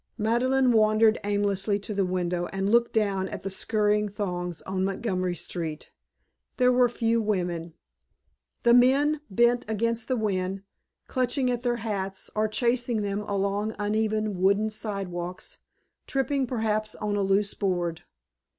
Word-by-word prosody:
Madeleine 250 +4 +2
wandered 215 0 +4
aimlessly 205 0 0
to 205 +1 -6
the 200 -1 +1
window 180 -1 -1
and 195 0 -2
looked 235 0 +4
down 200 -3 0
at - - -7
the 195 - -3
scurrying 210 +1 +1
throngs 180 -4 -4
on 190 0 -2
Montgomery 185 -2 -1
Street. 160 -2 -5 0.7
There 250 0 +4
were 250 -1 +4
few 230 -1 +1
women. 175 -6 -2 0.9
The 235 - +5
men 280 +5 +4
bent 240 +4 +3
against 230 +1 -1
the 255 - +1
wind, 195 -3 -1 0.4
clutching 255 0 0
at 240 -1 -2
their 245 -1 0
hats, 195 -3 -3
or 215 0 +1
chasing 235 0 0
them 200 0 -2
along 200 0 -1
the 215 -1 -5
uneven 215 -2 0
wooden 200 +3 +3
sidewalks, 190 -5 -5 0.5
tripping 270 -1 0
perhaps 215 -3 -1
on 210 -1 -2
a 205 - +1
loose 195 +1 +1
board. 175 -4 -1
210 Hz, 140 wpm, -26 LUFS, 195-230 Hz, 0.9 s, The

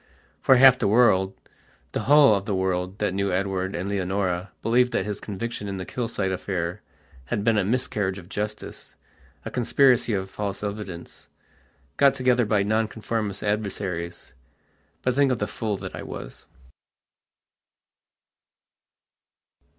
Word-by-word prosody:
For 130 - +6
half 130 0 +7
the - - +1
worldthe 100 -4 +3 0.6
whole 145 -4 +6
of 100 -1 -1
the 100 - 0
world 95 0 -1
that 105 -3 -1
knew 100 0 0
Edward 95 0 -1
and 90 +3 -3
Leonora 95 -2 -1
believed 125 +2 +3
that - - 0
his 105 -1 -4
conviction 105 +1 -5
in 100 -1 -4
the 95 - -5
Kilsyte 110 -3 -2
affair 90 0 -3 0.4
had 100 - -2
been 115 0 +3
a - - +2
miscarriage 105 -3 -1
of 90 -3 -11
justicea 105 +2 -6 0.6
conspiracy 125 -1 +3
of 95 -1 -2
false 100 -1 -4
evidence, 100 -4 -6 0.7
got 140 -1 +5
together 125 -3 +2
by 105 -2 +2
Nonconformist 110 -1 -2
adversaries. 95 -5 -3 0.7
But 125 - +2
think 140 0 +3
of 125 - +1
the 105 - -1
fool 105 -1 -3
that - - -7
I - - -6
was.... - - -9
105 Hz, 135 wpm, -25 LUFS, 95-115 Hz, 0.7 s, half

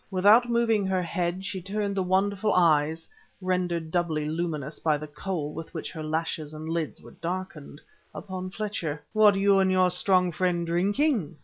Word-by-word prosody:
Without 210 +6 +5
moving 225 -4 +2
her 185 -1 0
head 175 +2 -2
she 190 -1 -4
turned 200 +2 -2
the 195 - +1
wonderful 195 +3 +1
eyes 160 -2 +2 0.3
(rendered 180 -3 -1
doubly 160 -3 0
luminous 155 -2 -3
by 155 -2 +1
the 150 - -7
kohl 150 0 -4
with 165 0 -7
which 160 - -4
her 160 - -7
lashes 155 -1 -3
and 155 +1 -7
lids 165 -2 -3
were - - -12
darkened) 170 -4 -6 0.3
upon 185 -2 -6
Fletcher. 180 -8 -4
"What 215 -2 +6
you 195 0 +4
and 190 -1 +3
your 185 -1 +3
strong 180 0 +2
friend 175 +1 0
drinking?" 190 - 0
180 Hz, 170 wpm, -27 LUFS, 160-195 Hz, 0.3 s, What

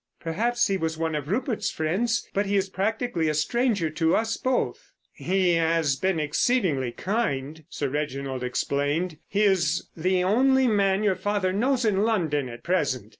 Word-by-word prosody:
"Perhaps 235 +9 0
he 195 - 0
was 160 -2 -2
one 160 0 -1
of 150 -2 -3
Rupert's 220 -1 -1
friends, 195 +10 -1
but 200 0 0
he 200 - 0
is 195 -1 +1
practically 200 -3 -1
a 155 - -1
stranger 205 - 0
to 160 +1 +1
us 225 0 0
both." 260 0 -2 0.2
"He 185 -1 +1
has 165 -3 +2
been 185 +4 0
exceedingly 150 - +1
kind," 160 - -2
Sir 145 - -3
Reginald 135 -2 -3
explained. 145 +6 -1
"He 205 +1 +1
is 185 -7 +1
the 180 +2 +1
only 260 +7 +3
man 200 -2 +2
your 205 -2 +3
father 190 0 -1
knows 250 +4 +1
in 200 -3 +2
London 160 - 0
at 120 0 -10
present. 140 - -1
185 Hz, 165 wpm, -25 LUFS, 155-210 Hz, 0.2 s, only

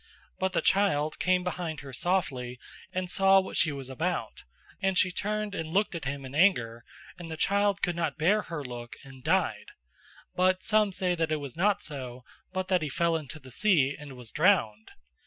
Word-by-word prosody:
But 190 0 0
the - - +1
child 155 -7 +2
came 185 0 +2
behind 175 -4 -4
her 135 -1 -10
softly 125 -7 -1 0.3
and 185 0 -2
saw 195 +1 +5
what 190 - -5
she 155 - +3
was 135 -2 -6
about, 160 +7 -3 0.4
and 190 -1 +1
she 185 - +4
turned 210 +2 -2
and 165 -5 -4
looked 200 +4 +1
at 165 -4 -5
him 140 0 -4
in 130 - -9
anger, 120 - +2 0.4
and 170 -2 -7
the 160 - -5
child 200 +2 +1
could 175 -2 +1
not 165 -4 -2
bear 190 +7 +3
her 165 -7 -6
look 120 -1 -7
and 135 -2 -13
died; - - +1 0.7
but 185 0 +2
some 215 -2 +3
say 180 -1 0
that 165 -2 -1
it - - +3
was 140 -3 -7
not 200 +4 +2
so, 130 -4 -6 0.3
but 185 0 -2
that 185 -2 +2
he 155 - -2
fell 170 +4 +1
into 155 -1 -5
the 130 -2 -14
sea 145 - +3
and 145 -2 -10
was 125 -3 -10
drowned. 130 - +2
165 Hz, 195 wpm, -28 LUFS, 140-190 Hz, 0.7 s, saw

